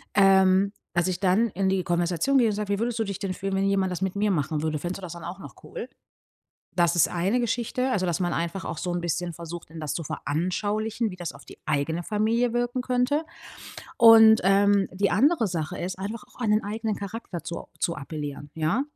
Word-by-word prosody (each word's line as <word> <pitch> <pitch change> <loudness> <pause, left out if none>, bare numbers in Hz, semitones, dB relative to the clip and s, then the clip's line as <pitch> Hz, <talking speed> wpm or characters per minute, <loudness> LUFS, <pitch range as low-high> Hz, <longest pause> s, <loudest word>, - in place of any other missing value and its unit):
Ähm, 195 0 +5 0.2
dass 175 +1 +1
ich 185 -1 -2
dann 200 +4 +3
in 195 -1 0
die 190 -1 +1
Konversation 175 - +1
gehe 235 - +4
und 215 - 0
sage: 210 -1 -4
„Wie 200 - -1
würdest 235 +1 -1
du - - +2
dich 200 -3 -5
denn 195 -2 -2
fühlen, 195 +1 -3
wenn 195 0 +1
jemand 195 -1 +1
das 180 - -4
mit 190 0 -1
mir 205 +1 +1
machen 150 -2 -1
würde? 155 -1 -1
Fändest 175 +4 -4
du - - -12
das 175 - -6
dann 170 -1 -10
auch 175 +2 -6
noch - - -11
cool?“ 480 -2 -7 0.9
Das 170 -1 +3
ist 170 - +5
eine 190 +8 0
Geschichte. 240 +2 -1
Also, 190 -7 0
dass 175 -1 -1
man 175 -2 0
einfach 170 +3 -2
auch - - -5
so 180 - -2
'n 175 - -1
bisschen 175 +1 -2
versucht, 170 0 -8
denen 160 0 -8
das 155 -2 -3
zu 170 - -3
veranschaulichen, 205 - -2
wie 180 - -9
das 175 -2 -5
auf - - -15
die - - -13
eigene 160 +4 0
Familie 225 +4 +1
wirken 245 +1 -1
könnte. 255 +5 +1 0.7
Und, 225 -2 +8
ähm, 200 0 +4
die 195 +1 +1
andere 255 - +3
Sache 165 -4 -3
ist 185 +1 -4
einfach 210 +4 -5
auch - - -20
an 230 -4 +1
den 215 +1 +2
eigenen 215 +1 -2
Charakter 200 -3 -6
zu 170 - -5
o - - -8
zu 170 - 0
appellieren. 145 0 -6
Ja? 160 +11 +1
195 Hz, 230 wpm, -26 LUFS, 175-220 Hz, 0.9 s, Und